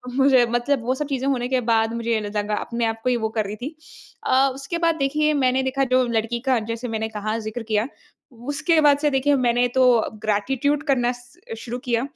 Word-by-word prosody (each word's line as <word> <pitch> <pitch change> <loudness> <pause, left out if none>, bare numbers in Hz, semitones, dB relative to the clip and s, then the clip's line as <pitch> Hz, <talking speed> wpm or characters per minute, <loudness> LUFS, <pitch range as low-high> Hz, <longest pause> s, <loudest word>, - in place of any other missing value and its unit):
मुझे 265 -2 +5
मतलब 240 +2 0
वो 255 - +1
सब 295 +2 -3
चीज़ें 270 -2 -2
होने 250 -3 0
के 255 0 0
बाद 225 0 +2
मुझे 230 -1 -1
ल 205 - -5
लगा 210 0 -1
अपने 235 +2 -2
आप 225 0 -2
को - - +1
ही 250 - +2
वो 220 -1 -2
कर 220 -1 -2
रही 200 +2 -5
थी। 270 +9 -7 0.5
अ, 270 +1 +3
उसके 275 +5 -4
बाद 335 -1 +2
देखिए 300 +1 +1
मैंने 260 -2 +2
देखा 265 +1 0
जो 255 - +4
लड़की 230 0 -1
का 255 -3 +3
जैसे 230 +2 -4
मैंने 220 -1 -3
कहा 215 +1 -3
ज़िक्र 220 +2 -5
किया। 215 +1 0 0.4
उसके 285 +7 0
बाद 290 -2 +5
से 295 0 +2
देखिए 275 +2 +2
मैंने 245 -1 +2
तो 260 - +6 0.4
ग्रैटिट्यूड 265 +8 0
करना 255 -5 +1
स 245 +6 -19 0.2
शुरू 235 +1 -5
किया। 235 -1 +1
245 Hz, 215 wpm, -22 LUFS, 225-275 Hz, 0.5 s, तो